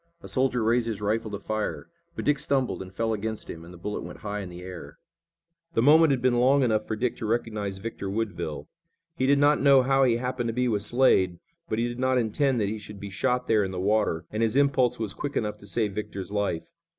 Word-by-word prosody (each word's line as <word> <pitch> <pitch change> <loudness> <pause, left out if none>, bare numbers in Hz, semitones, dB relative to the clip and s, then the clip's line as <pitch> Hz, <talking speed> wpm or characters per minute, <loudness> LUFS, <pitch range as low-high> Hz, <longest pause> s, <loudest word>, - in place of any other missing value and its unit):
A - - -8
soldier 130 -3 +1
raised 115 +1 +2
his 110 -4 -3
rifle 110 +2 -1
to 100 - -4
fire, 110 +1 -3 0.3
but - - -5
Dick 145 -1 +2
stumbled 135 -6 0
and 95 0 -8
fell 115 +3 -1
against 110 +1 -4
him 80 - -9
and 85 - -12
the 90 - -11
bullet 105 +5 -4
went - - -9
high 105 0 -4
in 95 -3 -6
the 90 0 -9
air. 90 -2 -9 0.8
The 115 - +3
moment 155 +3 +7
had 130 -3 0
been 125 -2 +3
long 135 +3 +4
enough 110 -3 +1
for 110 - -2
Dick 120 +2 -1
to 110 - -4
recognize 105 -4 -2
Victor 100 -1 -5
Woodville. 100 -7 -3 0.5
He 130 - 0
did 140 +1 +5
not 145 0 +4
know 140 -2 +6
how 135 +1 +3
he 120 -3 +3
happened 125 0 -2
to 115 - -2
be 125 +1 +1
with 105 -4 0
Slade, 105 -6 +3 0.3
but 110 - -1
he 115 +1 +1
did 120 0 -6
not 130 0 +2
intend 125 +3 +1
that 105 - +1
he 110 +2 -3
should 105 -1 -10
be 100 0 -7
shot 125 +5 0
there 110 -2 +3
in 95 - -2
the 95 -1 -5
water, 100 -4 +1
and 110 - -2
his 115 +1 +1
impulse 135 -3 +3
was 110 -4 -1
quick 145 +4 -4
enough 105 -1 -2
to 100 - -13
save 105 -1 0
Victor's 100 -2 -5
life. 100 -5 -1
110 Hz, 245 wpm, -26 LUFS, 100-125 Hz, 0.8 s, moment